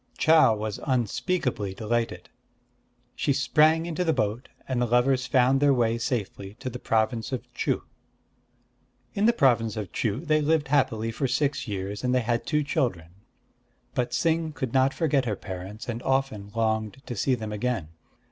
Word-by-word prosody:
Chau 155 Hz, -8 st, +5 dB
was 105 Hz, -1 st, -4 dB
unspeakably 125 Hz, -, -1 dB
delighted. 115 Hz, +2 st, -2 dB, 0.9 s
She 140 Hz, -, +1 dB
sprang 155 Hz, +4 st, +3 dB
into 170 Hz, +1 st, -2 dB
the 165 Hz, -, +2 dB
boat; 110 Hz, +2 st, -2 dB, 0.2 s
and 130 Hz, -2 st, -1 dB
the 120 Hz, -, +2 dB
lovers 130 Hz, +2 st, +2 dB
found 130 Hz, +1 st, +3 dB
their 140 Hz, -1 st, +4 dB
way 115 Hz, -1 st, +1 dB
safely 105 Hz, -4 st, -3 dB
to 130 Hz, +2 st, -6 dB
the 125 Hz, -, -7 dB
province 115 Hz, +2 st, 0 dB
of 130 Hz, -, -3 dB
Chuh. -, -, -1 dB, 1.3 s
In 205 Hz, +2 st, +2 dB
the -, -, +7 dB
province 120 Hz, -, +2 dB
of 100 Hz, -5 st, -5 dB
Chuh 115 Hz, +8 st, -2 dB
they 155 Hz, -1 st, +3 dB
lived 150 Hz, -1 st, +1 dB
happily 115 Hz, -6 st, +1 dB
for 135 Hz, +4 st, -1 dB
six 140 Hz, 0 st, 0 dB
years; 100 Hz, +1 st, -4 dB
and 125 Hz, 0 st, +1 dB
they 125 Hz, -, +3 dB
had 115 Hz, 0 st, -1 dB
two 150 Hz, -1 st, +1 dB
children. 120 Hz, -, -1 dB, 0.8 s
But 125 Hz, 0 st, 0 dB
Ts'ing 160 Hz, +4 st, 0 dB
could 130 Hz, -6 st, -4 dB
not 130 Hz, 0 st, +4 dB
forget 140 Hz, -4 st, +1 dB
her 105 Hz, -3 st, -1 dB
parents, 95 Hz, +3 st, -8 dB
and 120 Hz, -1 st, -4 dB
often 130 Hz, -7 st, -1 dB
longed 110 Hz, +3 st, -1 dB
to 120 Hz, -, -5 dB
see 130 Hz, +5 st, +1 dB
them 110 Hz, -3 st, -6 dB
again. 105 Hz, -6 st, -2 dB
125 Hz, 165 wpm, -26 LUFS, 110-140 Hz, 1.3 s, the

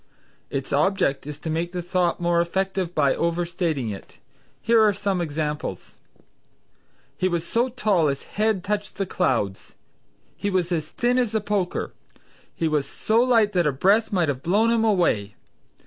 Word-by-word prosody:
Its 135 Hz, 0 st, -4 dB
object 145 Hz, -2 st, +1 dB
is 150 Hz, -1 st, -6 dB
to 155 Hz, -, -9 dB
make 165 Hz, +2 st, -2 dB
the 180 Hz, -, -2 dB
thought 175 Hz, 0 st, 0 dB
more 170 Hz, -1 st, +2 dB
effective 190 Hz, 0 st, -2 dB
by 140 Hz, -3 st, +3 dB
overstating 170 Hz, -, -1 dB
it. 100 Hz, -, -10 dB, 0.4 s
Here 230 Hz, 0 st, +4 dB
are 210 Hz, -1 st, +5 dB
some 195 Hz, -2 st, -1 dB
examples: 150 Hz, -, -4 dB, 1.2 s
"He 185 Hz, -, 0 dB
was 170 Hz, -2 st, -1 dB
so 235 Hz, +7 st, +1 dB
tall 210 Hz, -10 st, +1 dB
his 140 Hz, -1 st, -2 dB
head 215 Hz, -3 st, -1 dB
touched 205 Hz, 0 st, -3 dB
the 195 Hz, -, -1 dB
clouds." 125 Hz, -, -1 dB, 0.6 s
"He 205 Hz, -, -2 dB
was 185 Hz, -2 st, 0 dB
as 155 Hz, -3 st, -1 dB
thin 245 Hz, +1 st, +1 dB
as 230 Hz, -3 st, 0 dB
a -, -, +3 dB
poker." 205 Hz, -3 st, -2 dB, 0.6 s
"He 165 Hz, -, 0 dB
was 150 Hz, -3 st, 0 dB
so 220 Hz, +9 st, +1 dB
light 230 Hz, -4 st, +3 dB
that 175 Hz, -4 st, +2 dB
a -, -, +3 dB
breath 200 Hz, -, +2 dB
might 180 Hz, -5 st, +1 dB
have 135 Hz, -2 st, -2 dB
blown 210 Hz, +8 st, +2 dB
him 230 Hz, -1 st, +2 dB
away." 170 Hz, -, +1 dB
180 Hz, 165 wpm, -24 LUFS, 155-205 Hz, 1.2 s, are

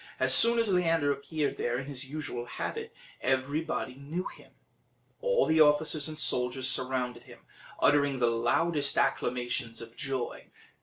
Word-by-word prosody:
As -, -, +5 dB
soon 235 Hz, +1 st, +10 dB
as 225 Hz, -4 st, 0 dB
Leander 165 Hz, -5 st, +1 dB
appeared 145 Hz, +1 st, -4 dB
there 120 Hz, 0 st, -2 dB
in 135 Hz, -, -6 dB
his 135 Hz, -1 st, -7 dB
usual 145 Hz, -5 st, -6 dB
habit, -, -, -6 dB, 0.3 s
everybody 135 Hz, +1 st, -2 dB
knew 145 Hz, +7 st, -6 dB
him; -, -, -12 dB, 0.7 s
all -, -, +1 dB
the 160 Hz, 0 st, +2 dB
officers 150 Hz, 0 st, +2 dB
and 155 Hz, -, -8 dB
soldiers 125 Hz, -2 st, +1 dB
surrounded 125 Hz, -2 st, -2 dB
him, -, -, -16 dB, 0.4 s
uttering 145 Hz, -2 st, +2 dB
the 125 Hz, -, +1 dB
loudest 140 Hz, +6 st, 0 dB
acclamations 120 Hz, -2 st, -2 dB
of 115 Hz, 0 st, -11 dB
joy. 135 Hz, -3 st, -6 dB
140 Hz, 145 wpm, -28 LUFS, 125-155 Hz, 0.7 s, soon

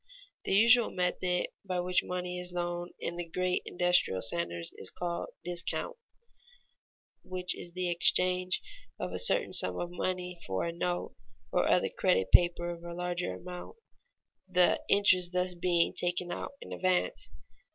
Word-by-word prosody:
The -, -, 0 dB
usual 235 Hz, +3 st, +6 dB
method 180 Hz, 0 st, -1 dB
by 185 Hz, -2 st, -2 dB
which 180 Hz, 0 st, +2 dB
money 180 Hz, 0 st, -4 dB
is 180 Hz, 0 st, -2 dB
loaned 175 Hz, 0 st, -3 dB
in 170 Hz, -, -4 dB
the 175 Hz, -, -2 dB
great 185 Hz, +2 st, 0 dB
industrial 180 Hz, -, +3 dB
centers 85 Hz, -5 st, -1 dB
is 95 Hz, -, -2 dB
called 175 Hz, -1 st, -4 dB
discount, 175 Hz, -, -1 dB, 1.3 s
which 185 Hz, 0 st, -2 dB
is 175 Hz, -, -9 dB
the 180 Hz, 0 st, -2 dB
exchange 180 Hz, +1 st, +2 dB, 0.4 s
of -, -, -3 dB
a -, -, -2 dB
certain -, -, +3 dB
sum -, -, +3 dB
of 175 Hz, 0 st, -4 dB
money 180 Hz, 0 st, -3 dB
for 95 Hz, -1 st, -1 dB
a 170 Hz, -, -3 dB
note 175 Hz, +1 st, -2 dB, 0.4 s
or -, -, +2 dB
other -, -, +3 dB
credit 95 Hz, 0 st, +1 dB
paper 175 Hz, 0 st, +4 dB
of 170 Hz, 0 st, -9 dB
a 170 Hz, 0 st, -7 dB
larger 180 Hz, 0 st, -2 dB
amount, 180 Hz, -, -9 dB, 0.7 s
the 180 Hz, -1 st, +3 dB
interest 185 Hz, -3 st, +4 dB
thus 180 Hz, 0 st, 0 dB
being 175 Hz, -1 st, +1 dB
taken 175 Hz, 0 st, -1 dB
out -, -, -5 dB
in -, -, -8 dB
advance. 185 Hz, -, 0 dB
180 Hz, 150 wpm, -30 LUFS, 175-180 Hz, 1.3 s, usual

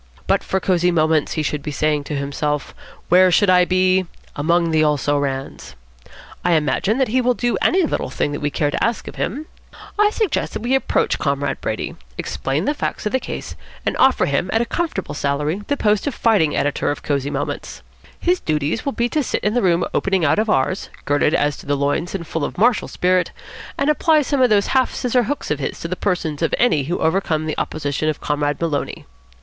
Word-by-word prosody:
'But -, -, +1 dB
for 190 Hz, -, -1 dB
Cosy 180 Hz, -2 st, +2 dB
Moments,' 155 Hz, -3 st, +2 dB
he 155 Hz, -, -1 dB
should 150 Hz, -1 st, -2 dB
be 150 Hz, -, -5 dB
saying 150 Hz, 0 st, 0 dB
to 150 Hz, -, -4 dB
himself, 145 Hz, +1 st, -2 dB, 0.4 s
'where 185 Hz, +1 st, +6 dB
should 185 Hz, +2 st, +4 dB
I 180 Hz, -1 st, +5 dB
be? 185 Hz, 0 st, +2 dB, 0.3 s
Among 170 Hz, +3 st, +1 dB
the 155 Hz, -1 st, +3 dB
also 145 Hz, -1 st, +1 dB
rans.' 135 Hz, -1 st, -4 dB, 0.7 s
I 175 Hz, -, +3 dB
imagine 165 Hz, +8 st, +1 dB
that 265 Hz, -3 st, +1 dB
he 255 Hz, +3 st, +2 dB
will 250 Hz, 0 st, +2 dB
do 240 Hz, 0 st, 0 dB
any 370 Hz, +1 st, +3 dB
little 315 Hz, -, -1 dB
thing 145 Hz, -, -1 dB
we 145 Hz, -, 0 dB
care 145 Hz, 0 st, 0 dB
to -, -, -1 dB
ask 230 Hz, -1 st, -1 dB
of -, -, -8 dB
him. 295 Hz, +5 st, -3 dB, 0.5 s
I 420 Hz, 0 st, +5 dB
suggest 430 Hz, -3 st, -1 dB
that -, -, -5 dB
we 245 Hz, +2 st, 0 dB
approach 270 Hz, -, +1 dB
Comrade 140 Hz, -1 st, -1 dB
Brady, -, -, -3 dB, 0.2 s
explain 140 Hz, +7 st, -2 dB
the 295 Hz, -, +1 dB
facts 290 Hz, -, -4 dB
of 210 Hz, -, 0 dB
the 260 Hz, -, +1 dB
case, -, -, -6 dB, 0.3 s
and -, -, 0 dB
offer 265 Hz, -, +4 dB
him 140 Hz, +6 st, 0 dB
at 225 Hz, -, +2 dB
a 235 Hz, -, +1 dB
comfortable 315 Hz, -, -3 dB
salary 145 Hz, +6 st, -1 dB
the 285 Hz, -, 0 dB
post 210 Hz, +2 st, +1 dB
of 285 Hz, -, -2 dB
fighting 200 Hz, -10 st, +2 dB
editor 145 Hz, 0 st, 0 dB
of 145 Hz, -, -3 dB
Cosy 140 Hz, -1 st, -1 dB
Moments. 145 Hz, 0 st, -4 dB, 0.4 s
His 360 Hz, +1 st, +1 dB
duties 155 Hz, +5 st, -1 dB
will 280 Hz, -, -2 dB
be 235 Hz, -, 0 dB
to 305 Hz, -, 0 dB
sit 265 Hz, -, -2 dB
in 210 Hz, -, +1 dB
the 245 Hz, -, +2 dB
room 175 Hz, -2 st, +2 dB
opening 190 Hz, -4 st, +1 dB
out 155 Hz, -, +3 dB
of 220 Hz, 0 st, 0 dB
ours, 135 Hz, +7 st, 0 dB, 0.2 s
girded 145 Hz, +1 st, +2 dB
as 145 Hz, -1 st, +1 dB
to -, -, -13 dB
the 145 Hz, 0 st, +1 dB
loins 145 Hz, +6 st, -1 dB
and 170 Hz, -3 st, -4 dB
full 160 Hz, -1 st, -3 dB
of -, -, -4 dB
martial 230 Hz, +4 st, +3 dB
spirit, 180 Hz, 0 st, +1 dB, 0.5 s
and 280 Hz, -, 0 dB
apply 305 Hz, 0 st, +3 dB
some 280 Hz, 0 st, 0 dB
of 250 Hz, -, +5 dB
those 205 Hz, -2 st, +3 dB
half 260 Hz, -2 st, +2 dB
scissor 250 Hz, -1 st, +1 dB
hooks 290 Hz, -, -3 dB
of 150 Hz, -, 0 dB
his 135 Hz, -, -4 dB
to -, -, -3 dB
the 180 Hz, -, -3 dB
persons 175 Hz, -6 st, -2 dB
of 165 Hz, -, +1 dB
any 160 Hz, -, +2 dB
who 175 Hz, +5 st, -1 dB
overcome 160 Hz, -2 st, 0 dB
the 155 Hz, -, -2 dB
opposition 150 Hz, 0 st, -2 dB
of 155 Hz, -, -2 dB
Comrade 145 Hz, 0 st, -1 dB
Maloney. 155 Hz, -4 st, -2 dB
175 Hz, 215 wpm, -20 LUFS, 145-230 Hz, 0.7 s, where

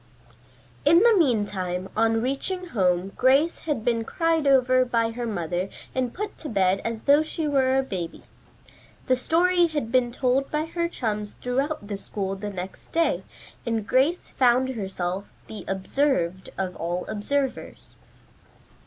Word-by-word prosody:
In 335 Hz, +2 st, +6 dB
the 465 Hz, 0 st, +6 dB
meantime, 205 Hz, -, 0 dB
on 225 Hz, +1 st, +2 dB
reaching 360 Hz, +8 st, -2 dB
home 185 Hz, -, +1 dB
Grace 275 Hz, +6 st, +3 dB
had 255 Hz, -7 st, -1 dB
been 230 Hz, -2 st, +1 dB
cried 325 Hz, +3 st, 0 dB
over 255 Hz, -1 st, +5 dB
by 230 Hz, -2 st, 0 dB
her 240 Hz, +1 st, -4 dB
mother 180 Hz, -2 st, -2 dB, 0.2 s
and 255 Hz, -2 st, -1 dB
put 420 Hz, -, -6 dB
to 305 Hz, -, -5 dB
bed 195 Hz, -2 st, +2 dB
as 230 Hz, -1 st, -4 dB
though 285 Hz, +2 st, +5 dB
she 315 Hz, 0 st, -3 dB
were 265 Hz, -2 st, +3 dB
a 270 Hz, -, +2 dB
baby. 180 Hz, -9 st, -5 dB, 0.8 s
The 255 Hz, -, +3 dB
story 345 Hz, +6 st, +3 dB
had 295 Hz, -8 st, -3 dB
been 250 Hz, -1 st, +3 dB
told 260 Hz, +2 st, +1 dB
by 300 Hz, +1 st, -1 dB
her 340 Hz, +1 st, -2 dB
chums 210 Hz, -8 st, -3 dB
throughout 270 Hz, +1 st, -2 dB
the 200 Hz, -1 st, -4 dB
school 195 Hz, -1 st, -4 dB
the 205 Hz, +2 st, -5 dB
next 190 Hz, -1 st, -7 dB
day, 330 Hz, 0 st, +1 dB, 0.4 s
and 225 Hz, -4 st, -1 dB
Grace 275 Hz, -, +1 dB
found 255 Hz, 0 st, +3 dB
herself 195 Hz, -4 st, -4 dB
the 215 Hz, -, -8 dB
"observed 190 Hz, -3 st, 0 dB
of 185 Hz, -2 st, -2 dB
all 175 Hz, +2 st, -2 dB
observers." 265 Hz, +6 st, -3 dB
245 Hz, 150 wpm, -25 LUFS, 200-285 Hz, 0.8 s, In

